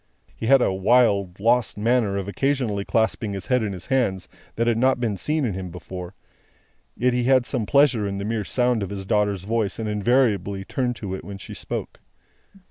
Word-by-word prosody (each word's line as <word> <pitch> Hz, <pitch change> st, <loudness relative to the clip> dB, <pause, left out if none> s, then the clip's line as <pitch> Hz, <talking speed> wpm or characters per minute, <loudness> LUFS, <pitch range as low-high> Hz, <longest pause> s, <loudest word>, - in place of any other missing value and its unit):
He 110 Hz, -, -4 dB
had 135 Hz, 0 st, +6 dB
a -, -, +1 dB
wild, 100 Hz, -2 st, +2 dB
lost 120 Hz, +2 st, +2 dB
manner 110 Hz, -2 st, +1 dB
of 100 Hz, -1 st, -3 dB
occasionally 120 Hz, -3 st, -1 dB
clasping 110 Hz, -1 st, 0 dB
his 95 Hz, -2 st, -5 dB
head 125 Hz, -1 st, +2 dB
in 105 Hz, -2 st, -2 dB
his 90 Hz, -3 st, -7 dB
hands, 115 Hz, -9 st, 0 dB, 0.3 s
that 115 Hz, -, 0 dB
had 115 Hz, -1 st, +1 dB
not 130 Hz, +1 st, +3 dB
been 115 Hz, -4 st, -1 dB
seen 150 Hz, +8 st, -1 dB
in 110 Hz, -, -1 dB
him 95 Hz, -1 st, -5 dB
before; 90 Hz, +1 st, -8 dB, 0.8 s
yet, 125 Hz, +1 st, +2 dB
he 125 Hz, -1 st, 0 dB
had 130 Hz, -1 st, +4 dB
some 120 Hz, -6 st, -2 dB
pleasure 130 Hz, -7 st, +3 dB
in 100 Hz, 0 st, -3 dB
the 100 Hz, -, -4 dB
mere 110 Hz, 0 st, -1 dB
sound 125 Hz, +1 st, +1 dB
of 100 Hz, -, -3 dB
his 100 Hz, -1 st, -6 dB
daughter's 100 Hz, -2 st, 0 dB
voice, 110 Hz, -1 st, -1 dB
and 110 Hz, -, -3 dB
invariably 105 Hz, -3 st, +1 dB
turned 125 Hz, +1 st, -1 dB
to 100 Hz, -4 st, -6 dB
it 95 Hz, -, -5 dB
when 100 Hz, -1 st, -8 dB
she -, -, -9 dB
spoke. -, -, -6 dB
110 Hz, 205 wpm, -23 LUFS, 100-125 Hz, 0.8 s, had